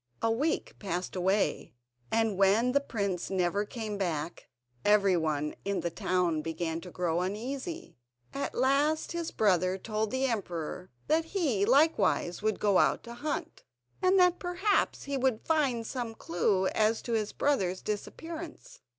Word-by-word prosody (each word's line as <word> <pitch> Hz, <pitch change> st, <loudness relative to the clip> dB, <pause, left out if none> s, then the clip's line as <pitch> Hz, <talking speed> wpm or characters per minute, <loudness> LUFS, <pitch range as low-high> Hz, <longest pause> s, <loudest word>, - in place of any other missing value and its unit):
A 225 Hz, -, +3 dB
week 285 Hz, +8 st, -1 dB
passed 185 Hz, -3 st, -3 dB
away, 190 Hz, -, 0 dB, 0.4 s
and 225 Hz, -2 st, +2 dB
when 200 Hz, +6 st, +4 dB
the 280 Hz, -, +4 dB
prince 200 Hz, -9 st, -2 dB
never 190 Hz, +2 st, 0 dB
came 215 Hz, -2 st, -5 dB
back 170 Hz, -3 st, -3 dB, 0.3 s
everyone 170 Hz, -8 st, +2 dB
in 200 Hz, -1 st, -1 dB
the 170 Hz, -, -2 dB
town 175 Hz, -2 st, 0 dB
began 165 Hz, +1 st, -3 dB
to 180 Hz, -, -9 dB
grow 175 Hz, -1 st, -1 dB
uneasy. 260 Hz, -, -5 dB, 0.3 s
At 275 Hz, -, -3 dB
last 280 Hz, +5 st, +2 dB
his 340 Hz, -1 st, -3 dB
next -, -, -8 dB
brother 185 Hz, -3 st, +3 dB
told 215 Hz, +2 st, -2 dB
the 260 Hz, +3 st, 0 dB
emperor 180 Hz, -6 st, -3 dB, 0.2 s
that 320 Hz, +1 st, +2 dB
he 295 Hz, -, 0 dB
likewise 260 Hz, -, +3 dB
would 215 Hz, -1 st, 0 dB
go 200 Hz, -3 st, +3 dB
out -, -, +2 dB
to 235 Hz, -, -8 dB
hunt, 290 Hz, +5 st, -4 dB, 0.4 s
and 370 Hz, +1 st, +4 dB
that 360 Hz, -1 st, +4 dB
perhaps 375 Hz, +3 st, 0 dB
he 280 Hz, -1 st, -2 dB
would 255 Hz, -4 st, 0 dB
find 275 Hz, -8 st, +1 dB
some 235 Hz, -2 st, -4 dB
clue 185 Hz, +2 st, +1 dB
as 220 Hz, +1 st, +1 dB
to 235 Hz, -, -3 dB
his 215 Hz, -2 st, 0 dB
brother's 190 Hz, -11 st, 0 dB
disappearance. 320 Hz, -, -6 dB
215 Hz, 150 wpm, -30 LUFS, 185-275 Hz, 0.4 s, when